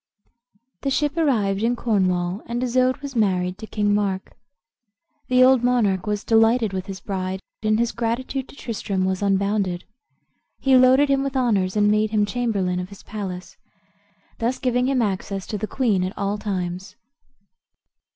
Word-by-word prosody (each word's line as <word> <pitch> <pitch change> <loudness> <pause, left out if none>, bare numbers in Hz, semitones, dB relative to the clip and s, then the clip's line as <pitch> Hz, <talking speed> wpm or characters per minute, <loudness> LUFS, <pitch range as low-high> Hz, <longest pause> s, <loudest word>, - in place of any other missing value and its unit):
The 275 - -1
ship 290 +2 0
arrived 215 - +1
in 235 +2 +1
Cornwall, 185 -4 0
and 240 +1 -2
Isoude 255 +2 +1
was 275 -2 -6
married 185 -3 +1
to 220 - -8
King 205 -1 0
Mark, 195 -2 -1 0.9
The 255 0 +5
old 260 -1 +5
monarch 215 -7 +1
was 210 0 -1
delighted 225 -1 +3
with 185 -1 -4
his 195 -1 -6
bride, 190 0 -3 0.2
and 215 0 +2
his 235 0 +1
gratitude 250 +3 -3
to - - -13
Tristram 200 -7 -3
was 190 0 -1
unbounded. 195 -2 0 0.8
He 270 -1 +3
loaded 255 +3 +6
him 275 -1 +3
with 275 -1 -2
honors, 205 -7 +1
and 205 0 +4
made 215 0 +2
him 210 -1 +2
chamberlain 200 -5 -1
of 180 0 -5
his 200 - -13
palace, 190 -4 -7 0.8
thus 240 +2 0
giving 250 -1 0
him 265 -3 +2
access 195 -1 -3
to 210 - -4
the 215 - -3
queen 215 -8 +1
at 185 +2 -4
all 200 +1 -1
times. 185 -2 -4
210 Hz, 160 wpm, -23 LUFS, 190-245 Hz, 0.9 s, loaded